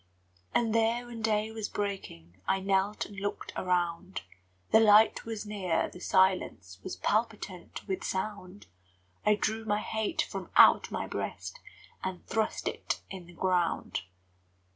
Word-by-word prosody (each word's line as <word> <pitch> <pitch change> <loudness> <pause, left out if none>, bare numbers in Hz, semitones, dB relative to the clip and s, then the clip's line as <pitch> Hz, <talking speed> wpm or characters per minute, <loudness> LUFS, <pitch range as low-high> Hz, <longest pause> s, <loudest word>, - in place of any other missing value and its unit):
And 230 -2 +2
there, 230 +2 +2
when 235 -2 -8
day 215 0 +1
was 220 -2 -4
breaking, 95 - -5
I 195 - +2
knelt 195 +2 +1
and 200 -1 -9
looked 205 +1 -4
around: 180 0 -1 0.5
The 220 - +8
light 215 0 +6
was 225 -2 -4
near, 190 -5 0
the - - -11
silence 180 - +1
Was - - -4
palpitant 210 -5 -2
with 190 -2 -2
sound; 190 0 -4 0.6
I 210 - +6
drew 220 +1 -1
my 210 -1 0
hate 220 +7 -1
from - - -6
out - - +7
my - - -3
breast - - -5 0.4
And 185 -1 -4
thrust 220 -1 -1
it - - -2
in 185 -3 -8
the 175 - -13
ground. 175 - 0
200 Hz, 140 wpm, -30 LUFS, 185-220 Hz, 0.6 s, The